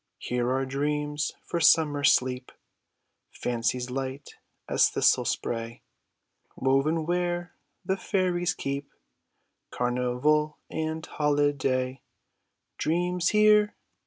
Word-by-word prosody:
Here 125 Hz, 0 st, -2 dB
are 135 Hz, +1 st, 0 dB
dreams 150 Hz, +2 st, -2 dB
for 170 Hz, -, -3 dB
summer 150 Hz, -3 st, +4 dB
sleep; 125 Hz, -2 st, +2 dB, 0.8 s
Fancies 125 Hz, +1 st, -2 dB
light 135 Hz, +2 st, -5 dB, 0.4 s
as -, -, +4 dB
thistle -, -, +3 dB
spray. 115 Hz, 0 st, -3 dB, 0.7 s
Woven 140 Hz, +5 st, +1 dB
where 175 Hz, 0 st, -1 dB, 0.3 s
the 190 Hz, +2 st, 0 dB
fairies 180 Hz, -3 st, 0 dB
keep 140 Hz, +1 st, -4 dB, 0.8 s
Carnival 125 Hz, +5 st, 0 dB
and 160 Hz, 0 st, -3 dB
holiday; 140 Hz, -3 st, 0 dB, 0.8 s
Dreams 175 Hz, +2 st, 0 dB
here 210 Hz, 0 st, +4 dB
145 Hz, 90 wpm, -27 LUFS, 130-170 Hz, 0.8 s, summer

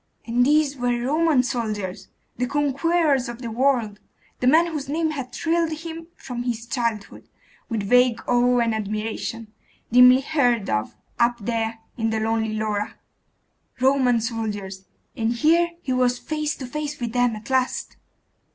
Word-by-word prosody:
And 240 Hz, +1 st, +2 dB
these 295 Hz, +1 st, +3 dB
were 245 Hz, -1 st, 0 dB
Roman 295 Hz, +1 st, +2 dB
soldiers! 215 Hz, -7 st, -3 dB, 0.3 s
the 250 Hz, +1 st, -1 dB
conquerors 290 Hz, 0 st, +1 dB
of 240 Hz, 0 st, -7 dB
the 230 Hz, -, -4 dB
world! 235 Hz, -4 st, +1 dB, 0.4 s
the 250 Hz, -, 0 dB
men 320 Hz, +6 st, +6 dB
whose 300 Hz, -5 st, -5 dB
name 315 Hz, +1 st, 0 dB
had 270 Hz, -4 st, -5 dB
thrilled 330 Hz, 0 st, 0 dB
him 330 Hz, +1 st, -7 dB
from 245 Hz, -1 st, -6 dB
his 235 Hz, -2 st, -3 dB
childhood 230 Hz, -4 st, -3 dB, 0.4 s
with 225 Hz, -4 st, -2 dB
vague 245 Hz, +2 st, +4 dB
awe 245 Hz, 0 st, +3 dB
and 230 Hz, -1 st, +1 dB
admiration, 215 Hz, +1 st, -4 dB, 0.4 s
dimly 250 Hz, +2 st, +7 dB
heard 245 Hz, -, +1 dB
of 110 Hz, 0 st, -1 dB, 0.2 s
up 235 Hz, 0 st, +3 dB
there 225 Hz, +1 st, -2 dB, 0.2 s
in 225 Hz, -1 st, 0 dB
the 220 Hz, 0 st, -1 dB
lonely 220 Hz, 0 st, 0 dB
Laura.... 210 Hz, -1 st, -2 dB, 0.8 s
Roman 260 Hz, -2 st, +3 dB
soldiers! 205 Hz, -4 st, -4 dB, 0.3 s
And 225 Hz, +1 st, 0 dB
here 330 Hz, +7 st, +3 dB
he 260 Hz, -, -1 dB
was 250 Hz, -1 st, +2 dB
face 305 Hz, +2 st, -3 dB
to 265 Hz, -, -7 dB
face 300 Hz, +3 st, -5 dB
with 235 Hz, -2 st, -4 dB
them 245 Hz, -2 st, +2 dB
at 220 Hz, +4 st, -9 dB
last! 260 Hz, -1 st, 0 dB
245 Hz, 150 wpm, -23 LUFS, 225-280 Hz, 0.8 s, dimly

